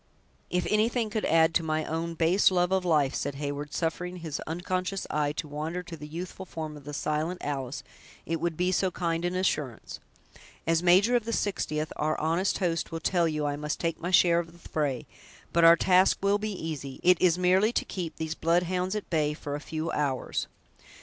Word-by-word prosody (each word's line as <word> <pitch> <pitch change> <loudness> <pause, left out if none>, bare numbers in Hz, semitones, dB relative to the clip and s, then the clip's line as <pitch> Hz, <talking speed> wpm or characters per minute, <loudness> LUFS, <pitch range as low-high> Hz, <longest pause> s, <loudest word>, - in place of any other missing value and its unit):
"If 180 0 0
anything 220 +1 +1
could 215 0 -1
add 160 +1 +4
to - - +3
my 155 -1 -1
own 165 +1 -3
base 170 +5 +4
love 180 -1 +1
of 190 -1 +2
life," 150 -6 +2
said 145 0 -2
Heyward, 145 +1 -4
suffering 180 +3 -2
his 160 -4 -5
unconscious 185 +3 -2
eyes 150 -1 0
to 155 - -3
wander 155 +5 -4
to 175 -2 -8
the 150 -1 -9
youthful 175 +4 -6
form 155 -2 -6
of 145 -2 -12
the 150 - -6
silent 155 +5 -1
Alice, 135 -1 -3 0.4
"it 165 0 -2
would 170 -2 -1
be 180 +1 +1
so 185 +1 +2
kind 170 -2 -2
an 175 +1 -1
assurance. 150 -10 -2 0.7
As 165 0 +2
major 190 +7 +5
of 235 -3 +1
the 230 - -2
Sixtieth, 155 -8 -1
our 155 +1 0
honest 165 +5 +1
host 170 -4 -1
will 165 - -3
tell 170 +1 +2
you 150 -2 -1
I 145 0 0
must 150 0 -3
take 165 -1 -2
my 175 - -2
share 175 -2 +5
of 165 -1 -6
the 170 - -15
fray; 145 -5 -1 0.5
but 170 - +4
our 165 0 +9
task 185 +2 +4
will 200 +1 +3
be 215 0 -3
easy; 150 -6 -5
it 180 -1 +5
is 180 -2 +4
merely 185 +4 +3
to - - 0
keep 175 -4 -5
these 160 -1 -3
blood 170 +2 +2
hounds 185 +2 -1
at 210 - -4
bay 150 -2 +1
for 145 -2 -6
a 145 - -2
few 160 +2 -4
hours." 140 -4 -1
165 Hz, 210 wpm, -28 LUFS, 155-180 Hz, 0.7 s, our